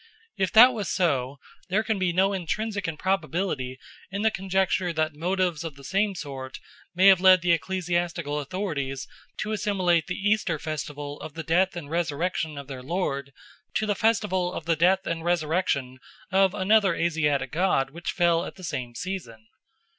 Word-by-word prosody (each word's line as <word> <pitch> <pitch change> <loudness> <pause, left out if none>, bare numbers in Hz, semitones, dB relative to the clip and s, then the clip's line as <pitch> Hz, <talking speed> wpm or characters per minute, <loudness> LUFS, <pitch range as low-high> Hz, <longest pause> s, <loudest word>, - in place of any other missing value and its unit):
If 190 -1 0
that 245 +3 +9
was 210 -4 -3
so, 140 -6 0 0.3
there 205 +4 +2
can 220 -2 -1
be 185 -2 +1
no 190 +3 +2
intrinsic 205 +3 -2
improbability 165 -5 -2 0.3
in 200 +2 -3
the 220 - +4
conjecture 190 -2 0
that 155 -1 -1
motives 175 +1 -1
of 160 -4 -6
the 140 - -14
same 195 +6 0
sort 135 -4 -7 0.4
may 185 +2 +4
have 190 -2 +7
led 185 -2 +7
the 175 - +3
ecclesiastical 170 -3 -1
authorities 145 -5 -3 0.3
to 215 - -3
assimilate 190 -5 +1
the 180 - -3
Easter 205 -5 +1
festival 145 -1 -5
of 155 - -8
the 165 - -5
death 180 +3 +2
and 170 -5 -6
resurrection 165 -1 -1
of 140 - -6
their 130 -2 -8
Lord 140 -2 -2 0.4
to 215 - +1
the 210 - +1
festival 200 -4 +1
of 155 - -6
the 165 -1 +2
death 185 +4 +3
and 165 -1 -3
resurrection 155 -6 0 0.3
of 190 +1 +3
another 200 -2 +3
Asiatic 160 -5 0
god 155 -6 +1
which 170 +3 -6
fell 170 -2 +2
at - - -7
the 185 - -13
same 125 -8 -4
season. 120 - -6
175 Hz, 170 wpm, -26 LUFS, 150-190 Hz, 0.4 s, that